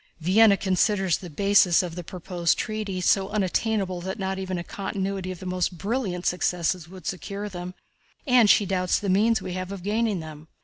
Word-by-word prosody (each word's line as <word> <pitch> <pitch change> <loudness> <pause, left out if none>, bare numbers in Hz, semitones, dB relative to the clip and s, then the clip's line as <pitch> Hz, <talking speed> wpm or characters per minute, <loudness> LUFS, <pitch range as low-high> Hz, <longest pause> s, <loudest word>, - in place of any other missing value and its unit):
"Vienna 200 +5 +5
considers 190 -1 +1
the 180 - -9
bases 190 +1 +4
of 175 -2 -5
the 175 +1 -6
proposed 175 0 -1
treaty 215 -3 -3
so 190 +2 +2
unattainable 195 -2 -1
that 190 +3 -4
not 190 -1 -3
even 185 -1 -3
a 170 - -4
continuity 195 0 -4
of 185 0 -8
most 180 -1 -1
brilliant 195 -2 -2
successes 180 -1 0
would 185 -3 -12
secure 200 +2 -4
them, 180 -2 -7 0.5
and 250 -6 +5
she 205 - +5
doubts 185 -1 +1
the 200 - -3
means 220 +4 +3
we 180 - -5
have 185 +1 -4
of 195 -3 -7
gaining 210 -1 0
them. 155 -1 -10
190 Hz, 180 wpm, -25 LUFS, 180-200 Hz, 0.5 s, Vienna